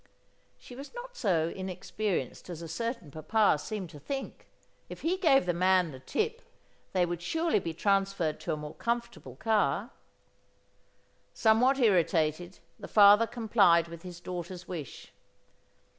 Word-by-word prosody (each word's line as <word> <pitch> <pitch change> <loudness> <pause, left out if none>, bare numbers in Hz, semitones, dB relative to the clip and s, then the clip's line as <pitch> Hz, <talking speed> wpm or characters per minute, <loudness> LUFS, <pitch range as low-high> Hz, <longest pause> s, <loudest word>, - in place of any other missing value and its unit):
She 245 - -13
was 280 - -10
not - - -8
so 170 - +1
inexperienced 185 - -4
as 170 -1 -7
a - - -6
certain 230 - -4
papa 160 +3 +2
seemed 190 0 -5
to 150 - -11
think. 270 - -6 0.4
If - - -9
he 340 +3 +1
gave 300 - +4
the 175 - +1
man 185 -1 +3
the 130 - -10
tip 450 - -2 0.5
they 180 -2 +2
would 175 0 -4
surely 325 - +1
be 165 -3 -5
transferred 195 -4 0
to - - -3
a - - -3
more 150 0 -7
comfortable 235 - -4
car. 220 - 0 1.4
Somewhat 240 +5 +4
irritated, 175 - +1 0.2
the - - -8
father 210 +2 +7
complied 205 -9 +3
with 170 -1 -9
his 180 -1 -9
daughter's 175 0 -7
wish. 160 -8 -8
190 Hz, 145 wpm, -29 LUFS, 170-235 Hz, 1.4 s, father